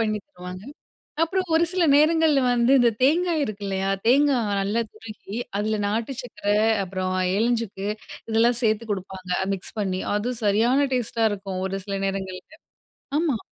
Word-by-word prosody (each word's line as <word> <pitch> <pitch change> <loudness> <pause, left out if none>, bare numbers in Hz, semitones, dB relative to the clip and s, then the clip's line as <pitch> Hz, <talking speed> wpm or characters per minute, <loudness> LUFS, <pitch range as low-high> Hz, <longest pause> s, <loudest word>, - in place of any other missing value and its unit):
பண்ணீ 215 -1 0
தருவாங்க. 180 +1 -9 0.6
அப்றம் 370 0 -1
ஒரு 335 +1 +4
சில 365 -1 +1
நேரங்கள்ல 310 -1 +4
வந்து 240 +1 +3
இந்த 240 -1 +5
தேங்காய் 325 +1 +3
இருக்கு 210 -3 -5
இல்லையா? 195 0 -1 0.2
தேங்கா 280 +1 +4 0.2
நல்லா 210 +4 0
துருகி, 215 -2 -10 0.2
அதுல 215 +1 0
நாட்டுச்சக்கர, 225 -1 -4 0.4
அப்றம் 185 0 -3 0.2
ஏலஞ்சுக்கு 225 -3 -1 0.4
இதெல்லாம் 230 +2 +3
சேத்து 220 0 +1
குடுப்பாங்க, 190 -1 -6
அ - - -4
மிக்ஸ் 190 +3 -6
பண்ணீ. 185 -1 -1
அது 235 +5 -1
சரியான 240 +7 +3
டேஸ்ட்டா 230 -2 0
இருக்கும் 195 -2 -4
ஒரு 195 +1 -3
சில 200 -1 -3
நேரங்கள்ல. 190 +8 -5 0.6
ஆமா 310 -8 +1
220 Hz, 140 wpm, -24 LUFS, 195-265 Hz, 0.6 s, இந்த